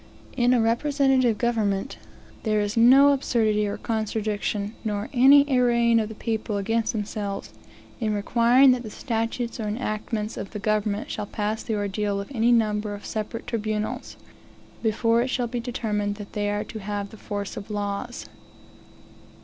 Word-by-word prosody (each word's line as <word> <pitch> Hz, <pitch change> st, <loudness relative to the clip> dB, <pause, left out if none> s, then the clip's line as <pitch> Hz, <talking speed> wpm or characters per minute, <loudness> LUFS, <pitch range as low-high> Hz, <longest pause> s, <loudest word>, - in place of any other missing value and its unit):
One -, -, -25 dB
answer -, -, -23 dB
is, -, -, -23 dB
that, 260 Hz, -, -2 dB
in 245 Hz, +1 st, +5 dB
a 245 Hz, -, +3 dB, 0.5 s
representative 245 Hz, -4 st, +3 dB
government, 220 Hz, -1 st, -1 dB, 0.4 s
there 215 Hz, -2 st, +1 dB
is 205 Hz, +2 st, -1 dB
no 260 Hz, +5 st, +7 dB
absurdity 220 Hz, -6 st, +1 dB
or 205 Hz, -, -3 dB
contradiction, 215 Hz, -1 st, -2 dB
nor 210 Hz, -1 st, -2 dB
any 275 Hz, +3 st, +7 dB
arraying 235 Hz, -3 st, +3 dB
of 215 Hz, -1 st, -2 dB
the 220 Hz, -, -8 dB
people 220 Hz, -2 st, -2 dB
against 225 Hz, +3 st, 0 dB
themselves, 205 Hz, -2 st, -4 dB, 0.5 s
in 220 Hz, -3 st, 0 dB
requiring 240 Hz, +5 st, +5 dB
that 250 Hz, -1 st, +1 dB
the 225 Hz, -, -7 dB
statutes 230 Hz, +1 st, -3 dB
or 215 Hz, -, -2 dB
enactments 215 Hz, 0 st, -3 dB
of 195 Hz, -, -6 dB
the -, -, -3 dB
government 210 Hz, 0 st, -1 dB
shall 210 Hz, -1 st, -4 dB
pass 215 Hz, +2 st, -2 dB
the 220 Hz, -, -2 dB
ordeal 205 Hz, 0 st, -1 dB
of 200 Hz, +6 st, -7 dB
any 235 Hz, 0 st, +3 dB
number 210 Hz, -2 st, +1 dB
of 205 Hz, -, -11 dB
separate 220 Hz, +2 st, -4 dB
tribunals, 215 Hz, -2 st, -3 dB, 0.6 s
before 230 Hz, +1 st, +2 dB
it 245 Hz, -, 0 dB
shall 255 Hz, -1 st, -1 dB
be 240 Hz, +1 st, -3 dB
determined 215 Hz, -4 st, -2 dB
that 205 Hz, -1 st, -10 dB
they 205 Hz, -1 st, -1 dB
are 205 Hz, 0 st, -1 dB
to 220 Hz, -, -8 dB
have 205 Hz, 0 st, -4 dB
the -, -, -11 dB
force 205 Hz, -1 st, -5 dB
of 200 Hz, +1 st, -8 dB
laws. 205 Hz, +3 st, -4 dB
220 Hz, 175 wpm, -25 LUFS, 205-235 Hz, 0.6 s, no